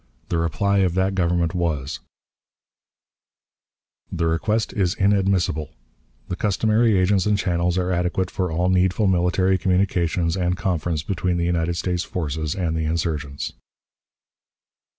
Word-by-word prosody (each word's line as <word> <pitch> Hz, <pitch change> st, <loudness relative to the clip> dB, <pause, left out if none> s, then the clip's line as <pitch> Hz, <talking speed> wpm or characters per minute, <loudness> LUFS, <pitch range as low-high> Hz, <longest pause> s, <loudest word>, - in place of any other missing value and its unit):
The 85 Hz, -, 0 dB
reply 100 Hz, +5 st, +1 dB
of 90 Hz, -3 st, +1 dB
that 95 Hz, +1 st, +1 dB
Government 85 Hz, -2 st, +1 dB
was: 80 Hz, -6 st, -2 dB, 2.1 s
"The 85 Hz, -, -1 dB
request 105 Hz, +7 st, 0 dB
is 95 Hz, -2 st, 0 dB
inadmissible. 95 Hz, -5 st, +1 dB, 0.6 s
The 90 Hz, -, -3 dB
customary 110 Hz, +2 st, +2 dB
agents 95 Hz, +1 st, +2 dB
and 105 Hz, -1 st, +2 dB
channels 90 Hz, -2 st, 0 dB
are 90 Hz, 0 st, 0 dB
adequate 90 Hz, +1 st, -1 dB
for 90 Hz, -3 st, -2 dB
all 90 Hz, +3 st, +1 dB
needful 95 Hz, +3 st, +2 dB
military 95 Hz, +1 st, +2 dB
communications 90 Hz, -2 st, +1 dB
and 90 Hz, -1 st, 0 dB
conference 85 Hz, -4 st, -1 dB
between 90 Hz, 0 st, -1 dB
the 85 Hz, -, 0 dB
United 85 Hz, 0 st, 0 dB
States 90 Hz, 0 st, -1 dB
forces 80 Hz, -4 st, -3 dB
and 85 Hz, -4 st, -1 dB
the 80 Hz, -1 st, -1 dB
insurgents." 75 Hz, -3 st, -2 dB
90 Hz, 130 wpm, -22 LUFS, 85-95 Hz, 2.1 s, customary